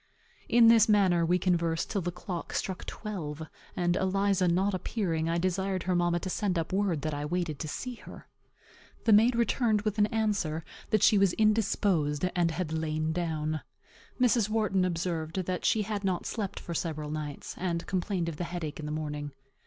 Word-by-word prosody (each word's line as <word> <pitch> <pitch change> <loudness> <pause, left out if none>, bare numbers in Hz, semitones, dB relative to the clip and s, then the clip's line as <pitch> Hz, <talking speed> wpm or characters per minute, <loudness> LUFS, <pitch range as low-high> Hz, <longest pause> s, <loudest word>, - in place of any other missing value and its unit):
In 235 0 +6
this 225 -1 +6
manner 190 -5 +4
we 175 +2 +3
conversed 170 -2 0
till 200 - 0
the 175 0 -2
clock 180 0 -6
struck 190 -2 -3
twelve; 160 -8 -5 0.3
and, 175 -1 +2
Eliza 195 0 +2
not 190 +4 +2
appearing, 170 -4 -1
I 170 - +1
desired 185 +1 -1
her 180 -1 0
mamma 175 0 +2
to - - -4
send 190 -3 0
up 165 +2 -2
word 190 -7 0
that 155 - -1
I 145 0 -3
waited 165 -1 -2
to 155 - -4
see 250 - -4
her. - - -12 0.8
The 225 - +5
maid 230 +4 +6
returned 230 -2 +2
with 215 0 -1
an 205 - +5
answer 205 -8 -1 0.2
that 215 - +2
she 210 - +6
was 195 -3 +4
indisposed, 200 -8 +2
and 175 -2 +3
had 160 -1 -3
lain 155 0 -1
down. 155 -2 -2 0.6
Mrs. 235 -4 +3
Wharton 215 -4 +1
observed 170 0 -2
that 180 0 -3
she 215 - +3
had 205 -1 -3
not 185 -3 -1
slept 200 -4 -3
for 170 - -6
several 155 -2 -3
nights, 150 -2 -5
and 170 -2 -2
complained 185 -2 -1
of 165 -3 -4
the 175 - -2
headache 165 -4 -5
in 150 - -5
the - - -4
morning. 150 -2 -4
180 Hz, 185 wpm, -29 LUFS, 160-205 Hz, 0.8 s, In